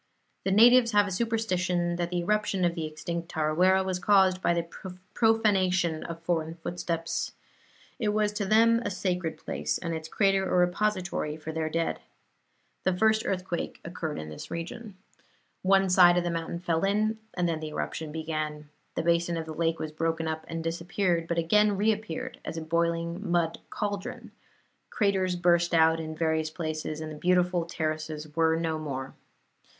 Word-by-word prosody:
The 195 - +1
natives 235 +3 +6
have 205 0 +5
a 200 - -4
superstition 185 -5 0
that 175 -1 -1
the 175 0 -1
eruption 200 0 +1
of 170 - +2
the 165 -2 -3
extinct 170 +2 -5
Tarawera 180 +5 +3
was 185 -1 -2
caused 190 -1 +4
by - - +2
the 170 0 +1 0.5
profanation 190 -7 +2
of 165 0 -6
foreign 165 -1 -1
footsteps. 165 -1 -3 0.7
It 220 -4 +1
was 210 0 +1
to 210 -1 -2
them 230 +2 +5
a - - -1
sacred 180 -3 -2
place, - - -2
and 170 -2 -4
its 160 -1 -5
crater 195 -1 +2
a - - +3
repository 180 -3 0
for 160 0 -6
their 160 0 -2
dead. 165 +1 -1 0.8
The 185 -1 +1
first 220 +2 +3
earthquake 185 -2 -3
occurred 165 -2 -4
in 75 - -6
this 75 - -8
region. 190 +5 -6 0.7
One 195 0 +4
side 180 -1 +6
of 175 - +2
the 175 - -1
mountain 165 0 -3
fell 170 -1 -1
in, 215 +3 +1 0.2
and 175 -1 +1
then 165 -2 -1
the 155 -1 -5
eruption 155 0 -4
began. 155 -1 -4 0.3
The - - -1
basin 170 0 +1
of 165 - -3
the 160 - -6
lake 165 0 0
was 155 - -4
broken 165 +1 -1
up 160 0 -3
and 165 0 -4
disappeared, 170 +1 -1
but 170 - -2
again 205 +5 +3
reappeared 220 +5 -1
as 165 - -5
a - - -3
boiling 170 +3 -1
mud 170 -1 +1
cauldron; 205 -2 -4 0.6
craters 190 -3 +1
burst 175 -1 +3
out 160 0 +5
in 155 -1 -5
various 160 -1 0
places, 155 -1 -4
and 155 0 -5
the - - -7
beautiful 180 +1 +2
terraces 155 -2 -4
were 160 0 +3
no 165 -1 -1
more. 135 -3 -5
175 Hz, 170 wpm, -28 LUFS, 160-195 Hz, 0.8 s, natives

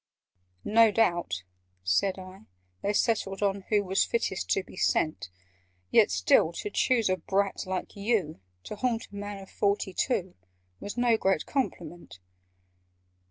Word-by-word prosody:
"No 225 +1 +5
doubt," 175 - +1 0.4
said 90 - +1
I, 185 +1 -11 0.4
"they 200 - 0
settled 210 -2 0 0.3
who 210 -2 +3
Was 190 0 +2
fittest 210 -5 -2
to 195 - +1
be - - -14
sent 155 - 0 0.6
Yet - - +5
still 95 - +3
to 205 - -5
choose 235 0 +2
a 185 0 +1
brat 195 +3 -1
like 185 0 -4
you, 200 - -1 0.2
To 210 - -7
haunt 235 0 -1
a - - -11
man 205 0 -5
of 195 -1 -12
forty 200 -2 0
two, 190 -5 -1 0.5
Was 205 - -7
no 240 -2 +3
great 190 -6 +1
compliment!" 175 - -4
195 Hz, 140 wpm, -28 LUFS, 180-220 Hz, 0.6 s, No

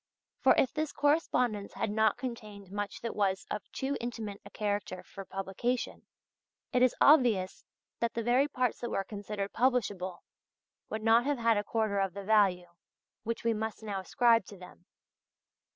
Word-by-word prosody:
For - - +5
if 265 - +3
this 310 -1 -2
correspondence 250 -8 +1
had 205 - -2
not 220 +1 +2
contained 215 -6 -7
much 205 0 -4
that 230 - -4
was 195 -2 0
of 210 - -5
too 270 +1 -2
intimate 225 -4 -5
a - - -11
character 205 -3 -3
for 195 -1 -10
publication, 195 +7 -3 0.7
it 250 - +3
is 255 -1 +4
obvious 235 -11 +4 0.4
that 235 -1 -1
the 230 - -1
very 250 +5 +3
parts 255 -4 -1
that 240 - -4
were 195 - -1
considered 205 0 -5
publishable, 205 -8 0 0.7
would 220 0 -4
not 230 +2 +5
have 290 -1 +1
had 230 -2 +3
a 205 - 0
quarter 215 -2 0
of 195 -2 -1
the 200 - -5
value 190 -4 +3 0.5
which 230 0 -4
we 230 0 +2
must 220 0 -4
now 205 -3 -3
ascribe 230 +4 +3
to 200 - -11
them. 180 -1 -14
215 Hz, 170 wpm, -31 LUFS, 200-240 Hz, 0.7 s, For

